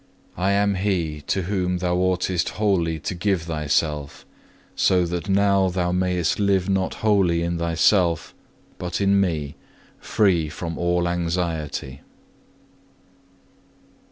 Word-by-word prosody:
I 95 Hz, +3 st, +1 dB
am 100 Hz, 0 st, +2 dB
He 90 Hz, -6 st, -1 dB
to 95 Hz, -, 0 dB
whom 90 Hz, -1 st, -1 dB
thou 90 Hz, 0 st, -1 dB
oughtest 90 Hz, -1 st, 0 dB
wholly 90 Hz, -6 st, +1 dB
to 100 Hz, -, -3 dB
give 90 Hz, -1 st, -1 dB
thyself; 75 Hz, -2 st, -2 dB, 0.5 s
so 90 Hz, -2 st, +3 dB
that 90 Hz, +3 st, -4 dB
now 100 Hz, -1 st, +3 dB
thou 90 Hz, -1 st, -1 dB
mayest 90 Hz, -1 st, 0 dB
live 100 Hz, -2 st, +2 dB
not 95 Hz, -1 st, 0 dB
wholly 95 Hz, -6 st, +3 dB
in 85 Hz, 0 st, -2 dB
thyself, 85 Hz, 0 st, +2 dB, 0.5 s
but 90 Hz, -1 st, -3 dB
in 100 Hz, 0 st, +3 dB
Me, 75 Hz, -6 st, -2 dB, 0.5 s
free 90 Hz, -7 st, +1 dB
from 85 Hz, +1 st, -5 dB
all 85 Hz, 0 st, +1 dB
anxiety. 85 Hz, -6 st, -3 dB
90 Hz, 120 wpm, -23 LUFS, 85-95 Hz, 0.5 s, so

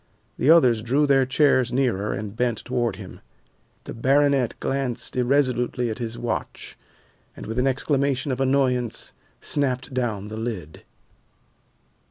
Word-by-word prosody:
The -, -, +2 dB
others 125 Hz, -9 st, +5 dB
drew 135 Hz, +6 st, +2 dB
their 135 Hz, -2 st, +3 dB
chairs 130 Hz, -2 st, +3 dB
nearer 120 Hz, -6 st, 0 dB
and 105 Hz, 0 st, -5 dB
bent 120 Hz, -2 st, -1 dB
toward 120 Hz, -4 st, -1 dB
him. 95 Hz, -2 st, -10 dB, 0.6 s
The -, -, -7 dB
baronet 135 Hz, 0 st, +2 dB
glanced 135 Hz, -3 st, -2 dB
irresolutely 125 Hz, -2 st, +1 dB
at 110 Hz, -, -6 dB
his 115 Hz, -1 st, -4 dB
watch, 120 Hz, -, -4 dB, 0.6 s
and -, -, -8 dB
with 110 Hz, +3 st, -3 dB
an 130 Hz, -, +2 dB
exclamation 140 Hz, +1 st, 0 dB
of 130 Hz, +1 st, -2 dB
annoyance 130 Hz, -3 st, 0 dB, 0.3 s
snapped 130 Hz, -3 st, -1 dB
down 110 Hz, -6 st, -2 dB
the 110 Hz, -, -6 dB
lid. 110 Hz, -9 st, -5 dB
125 Hz, 135 wpm, -24 LUFS, 115-135 Hz, 0.6 s, others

